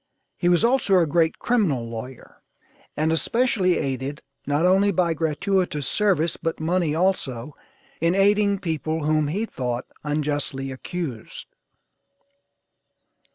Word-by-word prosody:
He 175 - +1
was 175 +5 +4
also 235 -6 +3
a 175 - +4
great 160 +1 +1
criminal 170 - +1
lawyer, 115 +2 -9 0.6
and 155 +2 +1
especially 190 +1 +2
aided, 135 +2 -3 0.2
not 145 +4 +2
only 195 +2 +4
by 175 -4 +1
gratuitous 160 0 0
service, 180 -6 +1
but 165 0 -3
money 165 -1 0
also, 150 -7 -1 0.4
in 170 +2 +2
aiding 200 +1 +3
people 160 -3 -2
whom 155 -1 +2
he 200 +9 -1
thought 125 - -3 0.2
unjustly 145 -2 -2
accused. 130 -3 -6
160 Hz, 115 wpm, -24 LUFS, 145-190 Hz, 0.6 s, was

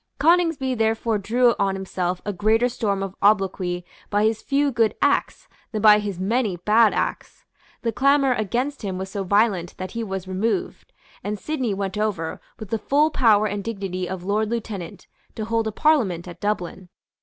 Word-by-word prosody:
Coningsby 325 -5 +2
therefore 225 -1 0
drew 240 +4 +3
on 195 -1 +1
himself 185 -1 -3
a 205 - -2
greater 220 +6 +2
storm 205 -5 -1
of 195 -1 -5
obloquy 190 -3 +1 0.2
by 205 0 +1
his 220 0 +1
few 280 +1 +1
good 225 -3 +1
acts - - 0 0.2
than 215 -2 -3
by 210 -1 +8
his 200 -4 -4
many 210 -1 0
bad 215 +5 +4
acts. - - -4 0.4
The 230 - 0
clamour 275 +1 +3
against 245 +6 -2
him 195 -4 -3
was 190 +1 -5
so 200 -2 -3
violent 195 -3 +1
that 185 0 -6
he 230 0 -3
was 190 -3 -5
removed; 225 - -2 0.3
and 210 +1 -3
Sidney 255 -4 -2
went 195 +1 -3
over, 190 -7 -2 0.2
with 215 -4 -9
the 225 - 0
full 295 +8 +2
power 220 -7 +4
and 205 -1 -3
dignity 190 -4 -4
of 185 -1 -5
Lord 210 +3 0
Lieutenant, 215 -7 -5 0.3
to 215 - -4
hold 225 0 0
a - - -2
Parliament 215 - +1
at 175 -1 -10
Dublin. 190 -3 -3
210 Hz, 180 wpm, -23 LUFS, 190-235 Hz, 0.4 s, by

